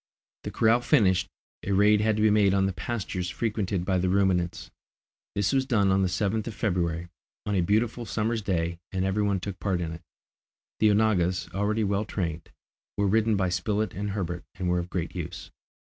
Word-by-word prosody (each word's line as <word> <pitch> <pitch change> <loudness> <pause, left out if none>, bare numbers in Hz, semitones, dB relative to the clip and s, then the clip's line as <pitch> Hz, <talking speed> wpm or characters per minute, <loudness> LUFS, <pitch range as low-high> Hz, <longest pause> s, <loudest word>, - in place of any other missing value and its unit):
The - - -2
corral 115 +2 +3
finished, 95 - +3 0.3
a 100 - -2
raid 105 +2 +5
had 110 0 +2
to 105 - 0
be 110 - +5
made 100 -2 +4
on 95 0 +3
the 95 - -1
pastures 90 -1 -3
frequented 100 -5 -2
by 95 -1 +1
the 90 +1 +1
ruminants. 90 -2 0 0.6
This 100 -1 +1
was 135 -1 +3
done 100 -6 +3
on 95 +1 +3
the 95 - +2
7th 100 +4 -1
of 115 - -5
February, 85 -4 -1 0.4
on 105 - -1
a 95 - +2
beautiful 110 +5 0
summer's 110 +1 -1
day, 85 -3 -1
and 95 0 -1
every 95 +2 0
one 100 -2 +1
took 95 0 -6
part 95 -3 0
in 85 -2 -3
it. 80 0 -8 0.8
The 110 - +5
onagas, 95 -4 +2
already 105 +3 0
well 100 +1 0
trained, 85 -6 -4 0.5
were 100 - +2
ridden 110 +2 +3
by 95 -2 +1
Spilett 100 +3 -1
and 100 +2 -3
Herbert, 90 -3 -3
and 90 -1 -3
were 90 0 +2
of 85 +1 -5
great 85 -2 -3
use. - - -6
100 Hz, 195 wpm, -27 LUFS, 90-105 Hz, 0.8 s, raid